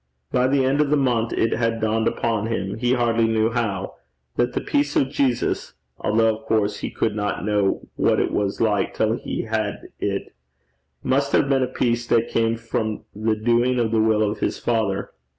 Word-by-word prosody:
By 125 Hz, 0 st, +3 dB
the 135 Hz, 0 st, +2 dB
end 140 Hz, +3 st, +2 dB
of 150 Hz, -, +1 dB
the 150 Hz, -, +3 dB
month 120 Hz, -4 st, +1 dB
it 115 Hz, -, +1 dB
had 115 Hz, 0 st, 0 dB
dawned 110 Hz, 0 st, +1 dB
upon 115 Hz, -2 st, 0 dB
him, 105 Hz, -2 st, -3 dB
he 125 Hz, +1 st, +2 dB
hardly 115 Hz, -2 st, +2 dB
knew 110 Hz, 0 st, +1 dB
how, 100 Hz, -5 st, -2 dB, 0.4 s
that 120 Hz, -, +1 dB
the -, -, 0 dB
peace 145 Hz, 0 st, 0 dB
of 135 Hz, 0 st, +2 dB
Jesus 135 Hz, -4 st, 0 dB, 0.2 s
(although, 110 Hz, +1 st, +2 dB
of -, -, -18 dB
course, 105 Hz, -2 st, +1 dB
he -, -, -3 dB
could 110 Hz, -2 st, -1 dB
not 105 Hz, -2 st, -2 dB
know 105 Hz, -2 st, 0 dB
what -, -, +3 dB
it -, -, 0 dB
was 100 Hz, -1 st, -1 dB
like 105 Hz, -4 st, +1 dB
till -, -, +1 dB
he -, -, -4 dB
had -, -, -3 dB
it) -, -, -3 dB, 0.7 s
must 140 Hz, +1 st, +1 dB
have -, -, +4 dB
been 135 Hz, -1 st, +2 dB
a 130 Hz, -, +1 dB
peace 120 Hz, -1 st, -1 dB
that 115 Hz, -1 st, +2 dB
came 115 Hz, 0 st, +1 dB
from 110 Hz, -1 st, -3 dB
the 110 Hz, +1 st, 0 dB
doing 120 Hz, +3 st, +2 dB
of 115 Hz, -2 st, +1 dB
the 110 Hz, -1 st, +3 dB
will 110 Hz, -1 st, +3 dB
of 105 Hz, 0 st, -1 dB
his -, -, -1 dB
Father. 110 Hz, -4 st, -1 dB
115 Hz, 200 wpm, -23 LUFS, 110-125 Hz, 0.7 s, have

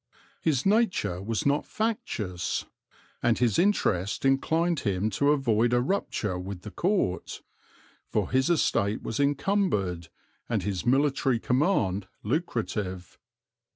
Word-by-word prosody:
His 145 Hz, -6 st, +1 dB
nature 195 Hz, -, +1 dB
was 110 Hz, +2 st, -2 dB
not 140 Hz, +1 st, +2 dB
factious; 110 Hz, -, -2 dB, 0.6 s
and 120 Hz, -2 st, +2 dB
his 120 Hz, -5 st, +2 dB
interest 105 Hz, -, +1 dB
inclined 160 Hz, +5 st, +2 dB
him 100 Hz, +1 st, -1 dB
to 140 Hz, +8 st, +2 dB
avoid 120 Hz, -5 st, +2 dB
a 120 Hz, -, +4 dB
rupture 120 Hz, -, -1 dB
with 90 Hz, 0 st, -7 dB
the 105 Hz, -, -7 dB
Court; 180 Hz, -, -1 dB, 0.6 s
for -, -, -1 dB
his 130 Hz, +3 st, +2 dB
estate 110 Hz, -10 st, +1 dB
was 115 Hz, -, -3 dB
encumbered, 140 Hz, -, 0 dB, 0.4 s
and 110 Hz, -6 st, 0 dB
his 100 Hz, +2 st, -3 dB
military 135 Hz, -1 st, +2 dB
command 115 Hz, -, +1 dB, 0.2 s
lucrative. 105 Hz, -, -3 dB
120 Hz, 120 wpm, -27 LUFS, 100-150 Hz, 0.6 s, a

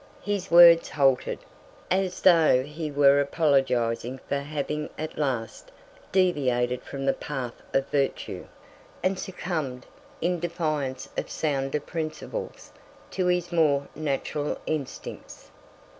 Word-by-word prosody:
His 205 Hz, -2 st, -2 dB
words 170 Hz, -1 st, +8 dB
halted, 135 Hz, -3 st, +2 dB, 0.5 s
as 185 Hz, -1 st, 0 dB
though 160 Hz, -8 st, +6 dB
he 150 Hz, +2 st, -5 dB
were 140 Hz, -1 st, +5 dB
apologizing 130 Hz, -5 st, +1 dB
for 140 Hz, -, 0 dB
having 150 Hz, +1 st, -3 dB
at 155 Hz, +1 st, -5 dB
last 125 Hz, -6 st, -3 dB, 0.4 s
deviated 125 Hz, -9 st, +1 dB
from 135 Hz, -1 st, -6 dB
the 135 Hz, -, +3 dB
path 130 Hz, -5 st, -5 dB, 0.2 s
of 135 Hz, 0 st, +1 dB
virtue, 140 Hz, -2 st, -2 dB, 0.6 s
and 185 Hz, 0 st, +1 dB
succumbed, 155 Hz, -9 st, -4 dB, 0.3 s
in 175 Hz, 0 st, 0 dB
defiance 155 Hz, -6 st, -2 dB
of -, -, -2 dB
sounder 140 Hz, -1 st, -1 dB
principles, 155 Hz, -, -6 dB, 0.4 s
to 185 Hz, -1 st, 0 dB
his 180 Hz, -1 st, 0 dB
more 145 Hz, -4 st, +2 dB
natural 150 Hz, 0 st, -2 dB
instincts. 150 Hz, -4 st, -6 dB
150 Hz, 115 wpm, -26 LUFS, 135-170 Hz, 0.6 s, words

